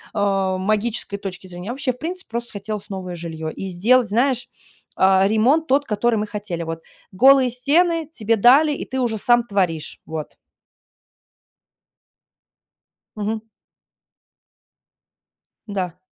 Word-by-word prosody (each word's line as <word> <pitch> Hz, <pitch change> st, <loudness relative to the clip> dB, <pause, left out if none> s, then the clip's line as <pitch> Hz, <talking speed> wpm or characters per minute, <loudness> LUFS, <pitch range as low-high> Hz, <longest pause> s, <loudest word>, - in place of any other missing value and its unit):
э, 195 Hz, -2 st, +1 dB
магической 210 Hz, +1 st, -1 dB
точки 190 Hz, -2 st, -7 dB
зрения, 180 Hz, +2 st, -8 dB
а 240 Hz, -, -2 dB
вообще, 270 Hz, -1 st, -1 dB
в -, -, -18 dB
принципе, 360 Hz, +5 st, -6 dB
просто 235 Hz, +1 st, -4 dB
хотелось 205 Hz, +1 st, -6 dB
новое 185 Hz, -2 st, -5 dB
жилье 160 Hz, -2 st, -5 dB
и 195 Hz, -, -6 dB
сделать, 225 Hz, +7 st, +3 dB
знаешь, 245 Hz, +3 st, +1 dB, 0.5 s
э, 190 Hz, 0 st, +4 dB
ремонт 245 Hz, +10 st, +3 dB
тот, 280 Hz, +2 st, +2 dB
который 225 Hz, +2 st, +1 dB
мы 210 Hz, -, -2 dB
хотели, 205 Hz, -5 st, -5 dB
вот: 165 Hz, 0 st, -5 dB, 0.3 s
голые 260 Hz, +5 st, +5 dB
стены 315 Hz, +6 st, +1 dB
тебе 225 Hz, +1 st, +1 dB
дали, 270 Hz, +8 st, +5 dB
и -, -, -5 dB
ты 260 Hz, 0 st, -4 dB
уже 230 Hz, -3 st, 0 dB
сам 240 Hz, +3 st, +3 dB
творишь. 180 Hz, -8 st, -2 dB
Вот. 155 Hz, -1 st, -6 dB, 2.8 s
Мгм. 215 Hz, +1 st, -3 dB, 2.3 s
Да. 185 Hz, -4 st, -3 dB
215 Hz, 125 wpm, -21 LUFS, 190-250 Hz, 2.8 s, голые